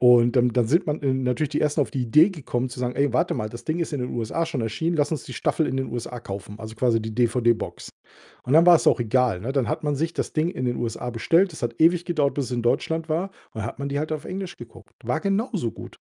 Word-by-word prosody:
und 120 -1 +6
dann 125 -1 +4
dann 120 -1 +1
sind 170 - +2
man 150 0 -1 0.2
natürlich 125 +4 0
die 150 - -1
ersten 150 0 +1
auf 140 - 0
die 130 - -1
Idee 150 - +5
gekommen 130 -7 -3
zu 125 0 -8
sagen: 125 0 -2
„Ey, 140 -3 +2
warte 125 - +1
mal, 110 - -3
das 120 +2 -10
Ding 160 +2 -1
ist 170 - -2
in 145 - -2
den 125 - -3
USA 120 +8 -1
schon 155 -6 -3
erschienen. 160 +10 -1
Lass 145 +1 +1
uns 155 - -2
die - - -9
Staffel 160 - 0
in 130 - -2
den 135 - -1
USA 120 +1 -5
kaufen", 100 -1 -7
also 110 0 -8
quasi 115 0 +2
die 110 0 -6
DVD-Box. 120 -1 0 0.5
Und 125 - -3
dann 165 +2 +7
war's 175 -2 +6
auch - - +3
egal, 120 -4 +1
ne? 120 +7 -3
Dann 135 -4 0
hat 155 +1 -2
man 145 -1 +1
sich 160 +4 -1
das - - -3
Ding 155 +1 +1
in 130 -9 -4
den 120 -1 0
USA 120 +1 -3
bestellt. 165 - +2
Das 155 - -10
hat 120 -1 -3
ewig 170 +2 +4
gedauert, 150 -6 +1
bis 140 -3 -1
es - - -8
in 120 -1 -1
Deutschland 160 +7 0
war 170 +5 -1 0.2
und 110 - -5
hat 110 - -5
man 140 0 -3
die 140 0 -2
halt 155 +1 -3
auf 155 -1 -3
Englisch 185 0 -5
geguckt. 115 -2 -13
War 125 +7 0
genauso 200 - -1
gut. - - -11
130 Hz, 270 wpm, -24 LUFS, 120-160 Hz, 0.5 s, dann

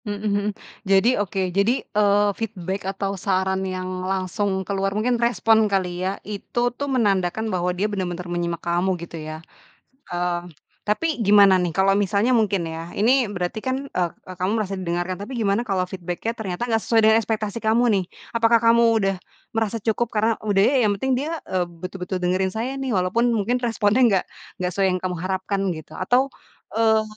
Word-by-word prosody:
Mhm 205 -1 -3
mhm. 205 -1 +1 0.4
Jadi, 195 +5 +5
oke, 190 -2 -2
jadi, 200 +7 +1
eee, 205 0 +3
feedback 195 -3 -4
atau 195 0 -2
saran 190 0 0
yang 185 -1 -3 0.2
langsung 190 +1 -1
keluar 195 +1 -1
mungkin 240 +2 +1
respon 225 -2 +3
kali 180 -3 -1
ya, 190 +1 -1
itu 240 +4 -2
tuh 285 +3 -4
menandakan 215 -3 +1
bahwa 180 0 0
dia 180 +3 -1
bener-bener 180 -4 -3
menyimak 170 -1 -3
kamu, 175 +2 +1
gitu 170 -1 -8
ya. 155 +1 -7 0.7
Eee, 175 0 -1 0.4
tapi 215 +10 0 0.2
gimana 200 -1 +7
nih, 175 - -1
kalau 190 +3 +3
misalnya 205 +5 +2
mungkin 200 -6 +1
ya, 165 +1 -6
ini 220 +4 +4 0.2
berarti 180 +2 -3
kan, 260 +2 -2
eee, 180 -2 -4
kamu 185 +2 -1
merasa 200 -2 -2
didengarkan, 175 0 -2
tapi 210 - -9
gimana 205 +1 +1
kalau 190 -5 -1
feedback-nya 185 +5 -4
ternyata 215 +1 -4
nggak 225 -2 +1
sesuai 230 - +3
dengan 220 0 +6
ekspektasi 215 0 -2
kamu 220 +2 +3
nih? 190 - +1 0.3
Apakah 230 0 +4
kamu 230 +1 +4 0.2
udah 195 -1 +1 0.4
merasa 225 0 0
cukup 225 +2 -1
karena, 220 +1 +2
udah 205 -2 +1
ya, 275 - +3
yang 210 - +3
penting 265 +2 +1
dia, 320 +2 -3
eee, 185 -1 0
betul-betul 180 +2 -6
dengerin 185 +1 0
saya 235 +6 -3
nih, 270 -1 -3
walaupun 215 +5 +2
mungkin 235 +3 0
responnya 225 +1 +2
nggak 200 -6 +4 0.4
nggak 180 0 0
sesuai 195 -1 +2
yang 185 - -1
kamu 180 -1 -1
harapkan 190 +1 -1 0.2
gitu, 155 -1 -11
atau, 250 +8 +2 0.4
eee, 220 0 +3
200 Hz, 175 wpm, -23 LUFS, 185-225 Hz, 0.7 s, gimana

